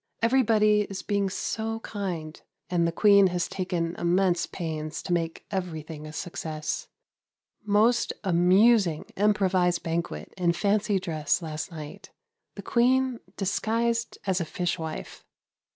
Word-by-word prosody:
Everybody 220 -4 +4
is 195 -1 -6
being 200 -2 0
so 225 +3 -3
kind, 175 -8 -5 0.3
and 170 -2 +2
the - - 0
Queen 200 +2 +6
has 175 -1 -1
taken 175 -3 -2
immense 175 0 +2
pains 155 -3 -5
to 180 - -1
make 165 -1 -2
everything 160 -5 -5
a - - -8
success. 160 -2 -4 0.8
Most 215 +3 +3
amusing 185 0 +4
improvised 190 -4 +2
banquet 165 +1 -3
in 175 -2 +1
fancy 200 +3 +1
dress 165 -2 -1
last 155 -1 -4
night. 155 -3 -9 0.5
The - - -8
Queen 255 0 +2 0.2
disguised 230 +4 0
as 190 -2 +1
a - - +1
fish 175 +2 -2
wife. 160 -1 -6
185 Hz, 125 wpm, -27 LUFS, 165-210 Hz, 0.8 s, Queen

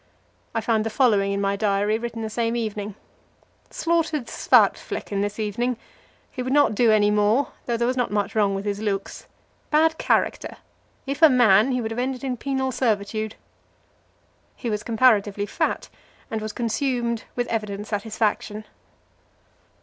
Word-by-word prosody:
I 225 - +1
find 220 -1 +1
the 225 - -2
following 210 -5 +2
in 200 - -1
my 200 0 0
diary, 205 +1 +1
written 230 -1 -5
the 220 - -3
same 230 +1 -1
evening: 210 -3 -3 0.7
"Slaughtered 330 -5 0
Svartflekken 200 -3 +1
this 205 0 -2
evening. 230 +3 -1 0.5
He 255 - -5
would 255 +1 -3
not 290 -4 +4
do 225 +1 +4
any 210 -1 +4
more, 210 +6 +2
although 235 -1 -2
there 235 - 0
was 250 +1 0
not 245 - +1
much 205 -1 -1
wrong 205 -3 +2
with 195 +1 -4
his 205 0 -2
looks. 200 -2 -3 0.4
Bad 320 +1 +3
character. - - 0 0.5
If 280 +2 -4
a 320 - +9
man, 240 -2 +5
he 250 -1 0
would 225 -1 -3
have 225 - -3
ended 255 +1 -2
in 260 -2 -1
penal 265 +1 -2
servitude." 215 -3 -1 1.2
He 235 - -4
was 210 0 -1
comparatively 215 -4 +2
fat, 205 - -2 0.4
and 220 -1 -2
was 215 0 -4
consumed 235 0 -1
with 245 - 0
evident 210 -2 -3
satisfaction. 215 0 -2
225 Hz, 155 wpm, -24 LUFS, 205-250 Hz, 1.2 s, a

